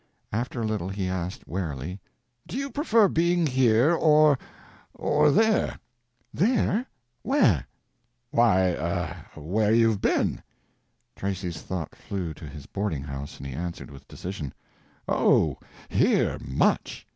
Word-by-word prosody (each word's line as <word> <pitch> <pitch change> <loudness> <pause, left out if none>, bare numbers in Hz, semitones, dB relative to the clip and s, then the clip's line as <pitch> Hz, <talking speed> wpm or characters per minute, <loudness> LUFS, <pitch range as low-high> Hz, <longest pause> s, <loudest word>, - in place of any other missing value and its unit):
After 120 +3 -2
a - - -1
little 105 -4 -2
he 95 -1 -3
asked, 90 0 -4
warily 85 0 -4 0.5
"Do - - -5
you 275 0 -3
prefer 230 -8 +4
being 170 0 +2
here, 130 +1 +4
or—or 150 -1 +2
there?" 220 +7 +2 0.6
"There? 230 - +1 0.3
Where?" 125 - +3 0.6
"Why—er—where 95 -2 +1
you've 115 -3 +3
been?" - - +1 0.7
Tracy's 90 -4 -4
thought 90 -5 -5
flew 90 -5 -5
to 75 - -10
his 70 0 -10
boarding 100 -9 -3
house, 70 0 -7
and 70 - -9
he 70 - -5
answered 85 +1 -5
with 70 0 -13
decision. 90 -6 -6 0.5
"Oh, - - +3 0.3
here, - - +2
much!" 65 - 0
100 Hz, 115 wpm, -26 LUFS, -, 0.7 s, prefer